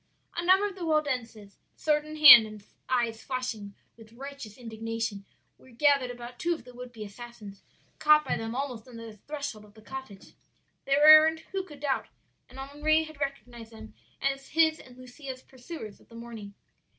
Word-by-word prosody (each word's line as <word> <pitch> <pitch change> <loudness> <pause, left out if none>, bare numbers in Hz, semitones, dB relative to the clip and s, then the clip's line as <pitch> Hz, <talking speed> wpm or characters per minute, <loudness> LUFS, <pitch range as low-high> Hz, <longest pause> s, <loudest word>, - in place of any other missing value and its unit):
"A 345 - -2
number 375 +3 +4
of 400 - -7
the 370 -2 -8
Waldenses, 250 -10 -2 0.2
sword 300 -1 0
in 305 0 -8
hand, 295 -8 +10
and 215 -1 -11 0.3
eyes 235 -3 0
flashing 240 -6 -5 0.2
with 225 -1 -17
righteous 270 -4 -9
indignation, 225 -3 -5 0.3
were 260 - -19
gathered 275 +1 +2
about 240 0 -9
two 345 0 0
of 320 - -13
the 250 +1 -14
would 250 0 -9
be 225 -3 -8
assassins, 210 -1 -11 0.4
caught 305 0 +5
by - - -1
them 225 +1 -5
almost 255 -4 -4
on 250 - -13
the 225 -2 -10
threshold 285 -7 -5
of 210 0 -19
the 220 - -16
cottage. 265 -6 -10 0.5
"Their 275 +2 +2
errand 310 +1 +8
who 390 - -1
could 295 -6 -14
doubt? 280 -2 -1 0.4
and 255 - -14
Henri 295 +4 +1
had 310 -2 -12
recognized 245 -5 -6
them 220 0 -12 0.3
as 275 0 -2
his 320 0 +2
and 250 -1 -15
Lucia's 255 +1 -9
pursuers 255 -4 -10
of - - -24
the 230 - -15
morning. 225 -4 -9
255 Hz, 180 wpm, -28 LUFS, 225-295 Hz, 0.5 s, hand